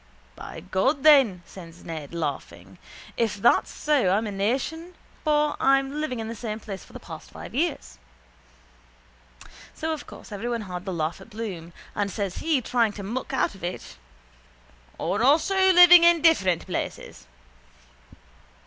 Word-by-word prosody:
—By - - -9
God, 190 - 0
then, 265 - +5
says 170 -2 -13
Ned, 155 -4 -7
laughing, 95 - -6 0.4
if 225 -3 0
that's 235 +4 +3
so 290 -10 +1
I'm 205 +4 +1
a 210 - -4
nation 270 - -2 0.3
for 300 -1 +2
I'm 275 +2 +2
living 255 -6 -3
in 220 - -4
the 230 - -5
same 220 -1 -5
place 195 -4 -8
for - - -18
the - - -8
past - - -11
five - - -10
years. - - -2 1.8
So 320 0 -2
of 310 - -8
course - - -13
everyone 230 +3 -3
had 180 -2 -7
the 190 - -3
laugh 160 -1 -3
at - - -14
Bloom 200 -7 -7 0.2
and 205 -1 -1
says 200 -2 -4
he, 310 -5 0
trying 230 -2 +1
to 205 - -8
muck 235 +6 -4
out - - 0
of 195 - -15
it: 175 +1 -6 1.0
—Or 205 - -2
also 380 - +4
living 355 -1 +9
in 340 -2 +5
different 190 - +3
places. - - -6
220 Hz, 155 wpm, -25 LUFS, 185-295 Hz, 1.8 s, living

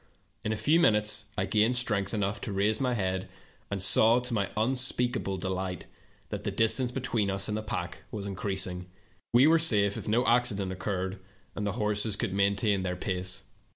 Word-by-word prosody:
In 110 - -2
a 110 - -1
few 155 +9 +3
minutes 105 -7 +2
I 95 - +1
gained 110 +5 +2
strength 105 -5 0
enough 105 -2 -2
to - - -4
raise 105 +4 0
my 125 -2 +1
head, 95 -3 -2 0.4
and 100 - -3
saw, 110 +5 +6
to 125 -1 -5
m3' 100 -3 0
unspeakable 125 -3 0
delight, 95 -1 -4 0.4
that - - -5
the - - -1
distance 120 +3 +1
between 120 -5 -1
us 95 0 0
and 105 - -2
the 110 - -2
pack 90 -4 -5
was 105 -2 -6
increasing. 95 -2 -2 0.4
We 120 +3 +6
were 165 +2 +5
safe 105 -10 +4
if - - -6
no 120 +4 +2
accident 115 -6 +1
occurred 95 0 -3 0.3
and 105 - -3
the 100 - -2
horses 105 0 0
could 105 -2 -3
maintain 100 +1 +1
their 90 -1 -2
pace. 95 0 -4
105 Hz, 185 wpm, -28 LUFS, 95-115 Hz, 0.4 s, saw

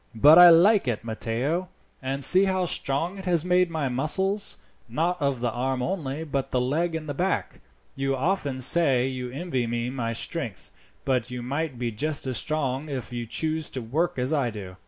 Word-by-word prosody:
"But 150 +9 +7
I 175 0 +10
like 180 +1 +5
it, 115 -3 -2
Matteo; 120 +10 -3 0.3
and 135 +1 -2
see 185 +8 +7
how 185 -1 0
strong 165 +4 -1
it 190 - -9
has 175 -3 +1
made 180 0 +2
my 160 -4 -2
muscles, 190 +11 0 0.3
not 165 +7 -1
of 140 -4 -1
the 120 -1 0
arm 130 +2 -2
only, 155 -3 -3
but 140 -4 -3
the 125 - 0
leg 160 +7 -1
and 160 -1 -5
back. 185 +6 -2 0.3
You 135 0 -1
often 140 -3 -2
say 135 -3 +3
you 130 -1 -5
envy 130 -3 -3
me 120 +1 -3
my 120 -3 -3
strength, 120 - -4 0.3
but 125 -3 0
you 125 -1 -6
might 140 +1 -3
be 120 -1 -3
just 145 +8 -2
as 130 -3 -2
strong 150 -1 -2
if 130 -3 -5
you 120 -1 -5
chose 160 +5 -1
to 130 - -5
work 150 +10 -1
as 130 +4 -1
I 140 -5 +1
do. 100 -4 -9
140 Hz, 190 wpm, -25 LUFS, 125-165 Hz, 0.3 s, I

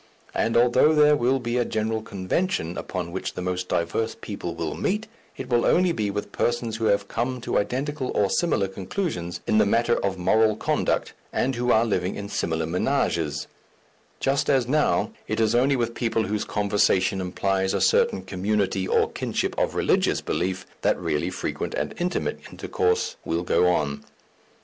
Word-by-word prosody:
And 115 - +1
although 125 +6 +5
there 150 0 +6
will 130 0 +2
be 120 0 -2
a - - +3
general 110 0 -1
convention 100 - -2
upon 90 -2 -4
which 95 - -4
the - - -4
most 90 0 -2
diverse 85 +7 -1
people 90 -5 -5
will 85 -2 -3
meet, 210 +3 -1 0.3
it 135 - -6
will 120 -2 +2
only 180 0 +3
be 110 -9 -1
with 105 0 -4
persons 120 -2 -1
who 115 - -2
have 100 -1 +2
come 125 +4 -2
to - - 0
identical 135 +5 -2
or 100 - +3
similar 145 - +1
conclusions 95 - -4
in 110 - +3
the 105 - +5
matter 120 +3 +2
of 95 -1 -1
moral 110 +4 +3
conduct - - 0 0.2
and 135 - 0
who 125 0 0
are 110 +1 +4
living 95 -4 -1
in 100 0 -6
similar 80 -4 -1
ménages, 85 - 0 0.7
just 135 +1 +1
as 130 -4 +3
now 150 +3 +2 0.2
it - - -2
is 110 0 +3
only 130 +3 +3
with 120 -2 -1
people 115 -2 0
whose 105 0 -2
conversation 95 -2 +1
implies 95 +1 0
a - - +1
certain 95 - +3
community 95 0 -1
or - - +2
kinship - - -2
of - - 0
religious - - +2
belief, 95 +1 -2 0.2
that - - +2
really 75 +4 -1
frequent 90 - -4
and - - -2
intimate - - -1
intercourse 90 0 -1
will 85 +1 -1
go 90 - +3
on. 70 -5 0
105 Hz, 175 wpm, -25 LUFS, 90-120 Hz, 0.7 s, there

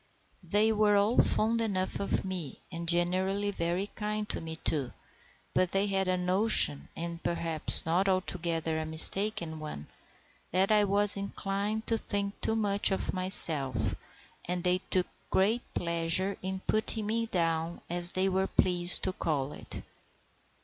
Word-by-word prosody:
They 210 +2 +2
were 210 -1 +2
all 205 +4 +2
fond 230 +2 0
enough 190 -4 -2
of 200 - -2
me, 180 -7 -6
and 170 -1 -5
generally 185 +4 0
very 175 +1 -2
kind 210 0 -5
to - - -2
me 160 -1 -7
too; 145 -5 -3 0.6
but 185 -1 +1
they 195 +1 +2
had 195 -2 -1
a 185 0 0
notion, 180 - +2
and 170 0 -6
perhaps 165 -2 -1
not 180 +4 +1
altogether 170 -4 -2
a 160 - -4
mistaken 165 0 +3
one, 150 - -8 0.7
that 190 +4 +1
I 210 -1 +4
was 205 +1 +5
inclined 200 +2 -3
to 225 -1 +1
think 200 -1 -3
too 220 - -1
much 205 -2 +2
of 195 - -2
myself, 140 - +3 0.5
and 180 0 -3
they 180 0 +1
took 185 -1 +1 0.2
great 215 +6 +1
pleasure 170 +3 -1
in 190 0 -5
putting 220 0 -1
me 230 +2 -1
down, 165 -3 -2
as 175 +1 +1
they 190 +1 +1
were 190 0 0
pleased 175 -1 +5
to 185 - -1
call 145 -6 -2
it. - - -7
185 Hz, 150 wpm, -29 LUFS, 170-205 Hz, 0.7 s, was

